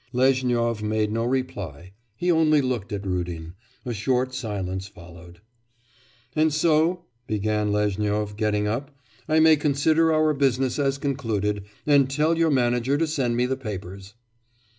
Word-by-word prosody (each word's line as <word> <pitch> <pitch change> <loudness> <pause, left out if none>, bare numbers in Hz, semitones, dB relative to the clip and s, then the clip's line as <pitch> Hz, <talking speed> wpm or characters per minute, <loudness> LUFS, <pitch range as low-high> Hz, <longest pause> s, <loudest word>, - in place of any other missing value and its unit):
Lezhnyov 125 -3 +1
made 105 0 0
no 115 +1 -1
reply, 100 - -3 0.2
he 175 +9 0
only 155 -2 +4
looked 125 -7 -2
at 100 -1 -4
Rudin. 85 -3 -4 0.3
A 120 - -3
short 125 +4 0
silence 95 -6 -4
followed. 85 -1 -14 0.9
'And 155 0 +3
so,' 160 +3 +2 0.2
began 105 0 0
Lezhnyov, 105 0 -1
getting 105 -1 0
up, 135 +6 -4 0.3
'I 155 +1 +4
may 160 0 +7
consider 155 +3 +2
our 155 -1 +3
business 135 -2 0
as 140 -1 +1
concluded, 110 -8 -2 0.2
and 140 -3 +4
tell 150 +4 +1
your 165 0 +2
manager 125 0 +1
to 165 - +1
send 135 -7 -1
me 125 - +2
the 130 +1 -1
papers. 100 -4 -8
120 Hz, 140 wpm, -24 LUFS, 105-140 Hz, 0.9 s, may